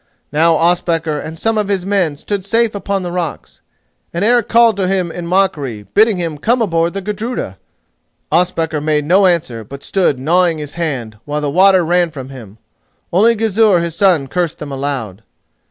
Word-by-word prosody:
Now 160 +3 +3
Ospakar 165 -2 +1
and 155 +2 -7
some 225 +4 0
of 210 - -1
his 195 -3 -1
people 190 -7 0
stood 200 +5 -4
safe 225 +3 +1
upon 200 -1 -2
the 175 - -4
rocks, 70 - -5 0.5
and 170 +4 -1
Eric 240 -1 +3
called 230 -1 +4
to 190 -2 0
him 185 -3 -1
in 175 0 -6
mockery, 150 - 0
bidding 215 -1 +4
him 165 -4 -4
come 240 - +1
aboard 170 -6 0
the 195 -1 -5
Gudruda. 210 - -4 0.7
Ospakar 165 -2 0
made 150 -1 0
no 190 +5 +4
answer, 155 -11 -1
but 140 +6 -10
stood 185 -8 +1
gnawing 170 +5 +2
his 150 -2 -7
hand, 130 -11 -4
while 150 0 -2
the 145 -1 -1
water 185 +1 +4
ran 175 +1 +2
from 135 -4 -9
him. 115 -6 -11 0.6
Only 225 +6 +4
Gizur 215 -3 +3
his 170 -1 -3
son 180 -9 +2
cursed 175 +2 -2
them 150 -2 -7
aloud. 135 -8 -4
170 Hz, 180 wpm, -16 LUFS, 150-195 Hz, 0.7 s, called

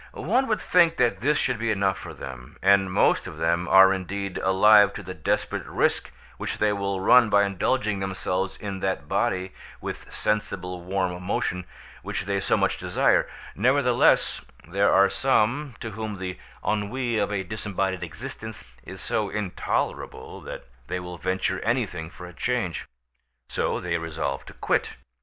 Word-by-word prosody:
One 250 - +1
would 215 - +1
think 170 -2 +4
that 110 -5 +2
this 145 +4 +2
should 125 -4 0
be 115 +1 -1
enough 100 -2 +1
for - - -8
them; 65 +2 -9
and 95 -1 +4
most - - +3
of - - -8
them 85 +2 +1
are 95 0 +7
indeed 95 0 -4
alive 100 +2 +6
to 105 - -7
the 90 0 -6
desperate 85 -4 -2
risk - - +1 0.3
which - - -3
they 105 -1 +2
will 100 -1 -2
run 120 +4 +6
by 100 0 +5
indulging 100 +2 0
themselves 95 0 -2
in 100 -2 -5
that 95 0 -2
body 95 0 0 0.3
with - - -7
"sensible 90 -4 -2
warm 90 -1 -2
motion" 90 -1 -2 0.4
which - - -3
they 100 0 -1
so - - +2
much - - +1
desire; - - +2 0.2
nevertheless, 125 +2 +3 0.3
there 100 +3 +2
are 100 0 +6
some 130 +3 +1
to 110 - -5
whom 110 -1 -5
the 95 -2 -5 0.3
ennui 115 +3 0
of 105 0 0
a 100 -2 -1
disembodied 95 -1 -2
existence 110 - -6 0.2
is - - -9
so - - -1
intolerable 105 -3 -3
that - - -8 0.2
they 90 - -2
will 90 -1 -8
venture 95 +1 -1
anything 110 -9 -1
for 90 - -11
a 90 - -10
change; 115 -6 -2 0.6
so - - -1
they 85 -1 -1
resolve 80 -4 -3
to - - -11
quit. - - -1
100 Hz, 160 wpm, -25 LUFS, 90-110 Hz, 0.6 s, are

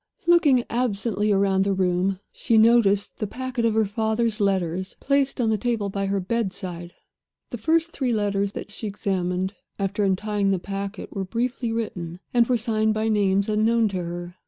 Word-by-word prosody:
Looking 320 -8 +5
absently 215 -3 0
round 195 -1 +3
the 195 0 0
room, 185 +1 +1
she 230 - +1
noticed 220 -3 +4
the 215 - -2
packet 250 +1 -3
of 225 -1 +2
her 220 -1 +3
father's 220 +2 0
letters 190 -2 -1
placed 275 -1 +1
on 225 -3 +2
the 215 - 0
table 225 -3 -1
by 195 0 -2
her 195 0 0
bedside. 185 -4 -3 0.6
The 240 - -5
first 325 +6 +1
three 260 -5 -1
letters 200 -2 0
that - - -7
she 215 +1 -5
examined, 190 -2 -2 0.2
after 200 +1 -1
untying 200 +1 0
the 195 - +2
packet, 195 +3 -6
were 195 - -1
briefly 235 +4 -2
written, 180 -7 -4
and 240 -1 +4
were 250 - +2
signed 220 -1 0
by 220 +1 0
names 200 -2 +2
unknown 220 +1 +2
to 195 - -3
her. 175 0 -5
210 Hz, 175 wpm, -24 LUFS, 195-230 Hz, 0.6 s, Looking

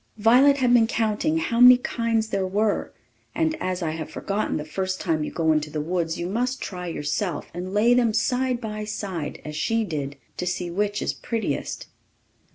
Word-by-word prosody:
Violet 250 +6 +5
had 250 -3 +3
been 230 -2 +5
counting 225 +9 0
how 235 -7 -1
many 250 0 +10
kinds 230 -3 -1
there 195 -2 -1
were; 205 +2 0 0.4
and 320 -1 +1
as 185 -1 -2
I 160 - -1
have 160 -1 -5
forgotten, 205 +2 -2
the 150 - -5
first 185 +4 -3
time 160 -3 0
you - - -3
go 160 -1 +1
into 155 -1 +1
the 150 - -4
woods 165 +1 -1
you 170 - -3
must 250 +6 -1
try 180 -2 -5
yourself, 165 +1 -3
and 180 +2 -5
lay 215 +4 +4
them 240 -2 +3
side 250 +3 0
by 215 -2 -5
side, 190 -7 -4
as 150 0 -6
she 225 +7 +1
did, 145 -7 -4 0.2
to 180 - -3
see 175 0 -2
which 205 +3 -1
is - - -1
prettiest. 230 -2 -3
205 Hz, 190 wpm, -24 LUFS, 170-230 Hz, 0.4 s, many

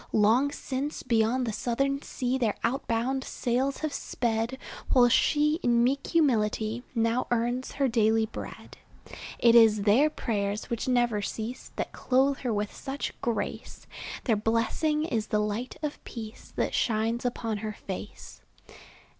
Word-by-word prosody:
Long 225 +7 +4
since 280 +1 -4
beyond 230 +2 +2
the 225 - -2
Southern 275 +6 0
Sea 260 -2 -2
Their 225 -5 +1
outbound 255 +1 0
sails 260 +3 -1
have 300 - -3
sped, 230 +1 -1 0.3
While 245 -2 +6
she, 300 +5 +3
in 235 -1 +3
meek 275 +3 +1
humility, 225 -6 +1
Now 230 +2 +1
earns 240 +2 -1
her 275 -1 +1
daily 225 -2 +3
bread. 220 - -9 0.6
It 235 -1 +5
is 220 -3 +6
their 235 +9 +5
prayers, 210 -5 -2
which 235 +1 -2
never 240 -4 +2
cease, 225 +4 -5
That - - -3
clothe 270 +2 +1
her 250 - -2
with 210 -1 -2
such 275 +1 -4
grace; 235 -1 -3 0.4
Their 230 - +2
blessing 230 +8 0
is 225 -8 -1
the 210 - +1
light 210 +4 -2
of 295 -1 -4
peace 225 -1 -9
That - - -1
shines 225 +1 0
upon 230 -3 -2
her 215 +1 -4
face. 200 0 -8
235 Hz, 145 wpm, -28 LUFS, 220-265 Hz, 0.6 s, While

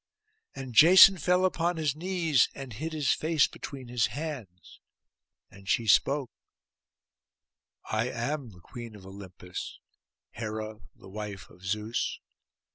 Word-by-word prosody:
And 130 -2 -7
Jason 185 - +8
fell 180 +4 +2
upon 175 -1 0
his 150 -3 0
knees, 165 -4 +1
and 135 -4 -8
hid 155 +9 -5
his 150 -3 0
face 155 -2 +2
between 135 -3 -8
his 120 -1 +1
hands. 130 - -8 0.7
And 100 +1 -13
she 115 - +1
spoke, 135 +5 +3 1.6
'I 110 +3 0
am 130 +2 -3
the 90 -4 -16
Queen 120 +1 -10
of 95 -2 -14
Olympus, 95 -2 -9 0.5
Hera 110 -1 -6 0.2
the - - -16
wife 105 -1 -7
of 90 - -19
Zeus. 105 +4 -2
125 Hz, 125 wpm, -28 LUFS, 105-155 Hz, 1.6 s, Jason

